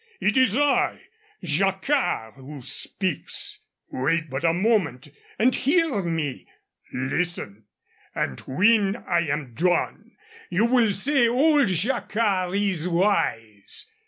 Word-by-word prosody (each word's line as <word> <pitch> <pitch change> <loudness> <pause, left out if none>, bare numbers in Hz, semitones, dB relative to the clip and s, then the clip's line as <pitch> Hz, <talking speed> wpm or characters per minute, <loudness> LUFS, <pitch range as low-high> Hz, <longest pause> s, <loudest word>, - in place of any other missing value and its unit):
It 210 - +1
is 260 -4 +3
I, 290 -1 +2 0.4
Jacquard, 190 - 0
who 140 +2 -10
speaks. 185 +5 -3 0.3
Wait 160 +3 -1
but 135 +3 -3
a 165 - +4
moment 175 - 0 0.3
and 245 +3 +3
hear 305 - +1
me. 165 -6 -3 0.4
Listen. 130 - -3 0.5
And 65 - -2
when 200 +7 +3
I 170 -7 -1
am 145 -4 -3
done 175 +7 -1 0.4
you 195 +6 +2
will 235 -3 +3
say 240 +5 +2
old 285 +3 +3
Jacquard 195 -1 0
is 195 -5 0
wise." 170 - -1
185 Hz, 110 wpm, -24 LUFS, 150-230 Hz, 0.5 s, a